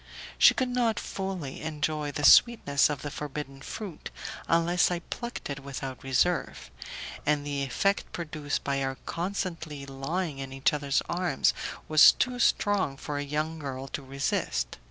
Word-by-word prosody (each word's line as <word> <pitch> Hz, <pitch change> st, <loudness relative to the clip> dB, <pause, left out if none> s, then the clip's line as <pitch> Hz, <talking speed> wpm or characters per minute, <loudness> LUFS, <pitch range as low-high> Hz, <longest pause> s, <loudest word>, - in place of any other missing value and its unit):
She -, -, +8 dB
could 260 Hz, -1 st, 0 dB
not 235 Hz, -4 st, +1 dB
fully 190 Hz, -8 st, -5 dB
enjoy 155 Hz, -1 st, -2 dB
the 145 Hz, -, -4 dB
sweetness 145 Hz, -14 st, +6 dB
of 145 Hz, -3 st, -4 dB
the 145 Hz, -, -4 dB
forbidden 145 Hz, -2 st, -6 dB
fruit 200 Hz, +2 st, -7 dB, 0.4 s
unless 170 Hz, +1 st, +3 dB
I 175 Hz, -, 0 dB
plucked 240 Hz, +7 st, -6 dB
it 140 Hz, -1 st, -4 dB
without 135 Hz, -1 st, -6 dB
reserve, 135 Hz, -, 0 dB, 0.5 s
and 145 Hz, -1 st, +1 dB
the 145 Hz, -1 st, -2 dB
effect 195 Hz, +9 st, 0 dB
produced 155 Hz, -3 st, -3 dB
by 140 Hz, -1 st, 0 dB
our 135 Hz, 0 st, -2 dB
constantly 165 Hz, -5 st, -4 dB
lying 140 Hz, +3 st, -3 dB
in 135 Hz, -1 st, -6 dB
each 135 Hz, +2 st, +2 dB
other's 140 Hz, -1 st, 0 dB
arms 180 Hz, 0 st, +1 dB, 0.3 s
was 155 Hz, -2 st, +8 dB
too 250 Hz, 0 st, -1 dB
strong 200 Hz, -, +2 dB
for 145 Hz, 0 st, -4 dB
a -, -, -2 dB
young 155 Hz, +3 st, -2 dB
girl 135 Hz, -2 st, -5 dB
to 150 Hz, -, -4 dB
resist. 135 Hz, -, -2 dB
150 Hz, 155 wpm, -28 LUFS, 140-175 Hz, 0.5 s, She